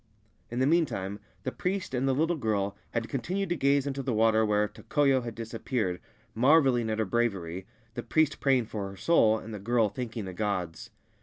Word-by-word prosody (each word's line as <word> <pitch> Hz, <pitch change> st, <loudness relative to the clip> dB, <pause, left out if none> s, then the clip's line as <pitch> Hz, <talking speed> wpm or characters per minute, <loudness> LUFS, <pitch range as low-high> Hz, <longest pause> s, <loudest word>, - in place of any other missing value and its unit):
In 120 Hz, -, -5 dB
the 130 Hz, -, +3 dB
meantime 120 Hz, -, 0 dB, 0.2 s
the 130 Hz, -, -2 dB
priest 185 Hz, -1 st, -3 dB
and 130 Hz, +1 st, 0 dB
the 135 Hz, -, +2 dB
little 160 Hz, +4 st, +1 dB
girl 100 Hz, -7 st, -1 dB
had 115 Hz, -1 st, -2 dB
continued 185 Hz, +8 st, -2 dB
to 175 Hz, -, +1 dB
gaze 140 Hz, -1 st, +2 dB
into 140 Hz, -1 st, -3 dB
the 130 Hz, -3 st, -1 dB
water 110 Hz, 0 st, +4 dB
where 105 Hz, -1 st, +2 dB
Tokoyo 135 Hz, +4 st, +1 dB
had 115 Hz, -2 st, -6 dB
dis 115 Hz, 0 st, -7 dB
appeared, 110 Hz, -6 st, -2 dB, 0.3 s
marvelling 130 Hz, -2 st, +4 dB
at 110 Hz, -, -1 dB
her 110 Hz, -, +1 dB
bravery, 95 Hz, -5 st, -1 dB, 0.3 s
the 120 Hz, -, -4 dB
priest 155 Hz, +3 st, +1 dB
praying 130 Hz, -4 st, +3 dB
for 105 Hz, -2 st, -5 dB
her 95 Hz, -, -11 dB
soul, 110 Hz, -, +4 dB
and 110 Hz, 0 st, -8 dB
the 105 Hz, -, -5 dB
girl 115 Hz, +1 st, +2 dB
thanking 115 Hz, -3 st, -5 dB
the 95 Hz, -, -6 dB
gods. 90 Hz, -4 st, -3 dB
115 Hz, 200 wpm, -28 LUFS, 105-135 Hz, 0.3 s, water